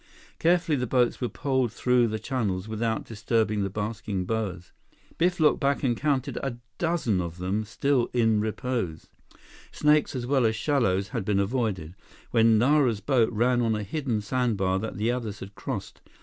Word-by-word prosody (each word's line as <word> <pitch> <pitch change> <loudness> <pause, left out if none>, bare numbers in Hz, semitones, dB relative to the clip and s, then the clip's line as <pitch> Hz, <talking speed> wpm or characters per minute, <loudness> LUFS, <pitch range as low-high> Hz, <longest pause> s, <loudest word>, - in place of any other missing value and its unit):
Carefully, 170 -2 +3
the 125 -1 -2
boats 125 +1 +1
were 125 - 0
poled 130 -4 0
through 125 +1 +2
the 110 0 -2
channels 105 -6 -2
without 110 +1 -2
disturbing 110 -1 0
the 100 - -1
basking 105 -1 -3
boas. 95 -5 -3 0.5
Biff 175 +1 +2
looked 155 -1 +4
back 140 -1 +1
and 120 -3 +2
counted 140 -1 -1
a 130 -3 -3 0.2
dozen 160 - +1
of 85 -1 -5
them, 95 +4 -1
still 125 +2 +1
in 115 -3 +2
repose. 110 -5 -3 0.6
Snakes 150 -1 +2
as 125 -2 -3
well 130 -2 +3
as 110 - 0
shallows 110 -8 +1
had 115 -6 -3
been 100 0 +1
avoided, 100 -6 -1 0.4
when 115 -1 +5
Nara's 125 -2 +3
boat 120 -1 +2
ran 120 +2 +2
on 115 -2 +1
a 105 - -3
hidden 120 -1 -2
sandbar 105 -5 0
that 110 +2 -5
the 110 +3 +1
others 115 -5 -4
had 95 +1 -9
crossed. - - -6
115 Hz, 170 wpm, -26 LUFS, 105-130 Hz, 0.6 s, when